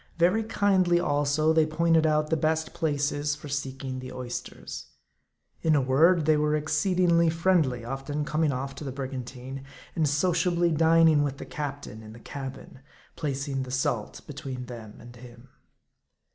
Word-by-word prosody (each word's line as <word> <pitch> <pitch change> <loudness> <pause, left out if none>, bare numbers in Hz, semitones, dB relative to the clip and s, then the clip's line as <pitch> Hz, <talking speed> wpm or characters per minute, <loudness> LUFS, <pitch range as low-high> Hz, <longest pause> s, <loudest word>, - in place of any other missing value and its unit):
Very 180 +6 +3
kindly, 190 -5 +2
also, 145 +1 +2
they 160 -1 +4
pointed 160 0 +3
out 155 0 +1
the - - +4
best 160 +1 0
places 145 -1 0
for 150 - -10
seeking 135 -2 -4
the 130 0 -8
oysters. 125 -1 -7 0.7
In 160 -1 +3
a - - +4
word, 155 +6 +4
they 155 0 +4
were 150 0 +2
exceedingly 170 +2 +2
friendly; 160 -8 +1
often 135 +4 -3
coming 155 0 +1
off 135 +1 -4
to - - -6
the 135 - -4
brigantine, 130 0 -6 0.3
and 155 -3 +2
sociably 175 +2 +2
dining 160 -1 +5
with 140 -1 -2
the - - -7
captain 145 -7 -6
in 110 0 -11
the, 115 - -12
cabin; 135 +1 -8 0.4
placing 140 -3 -2
the 130 - -5
salt 125 -4 -2
be 150 - -8
tween 130 -2 -6
them 115 -4 -9
and 120 +1 -13
him. 120 +1 -14
145 Hz, 160 wpm, -27 LUFS, 130-160 Hz, 0.7 s, dining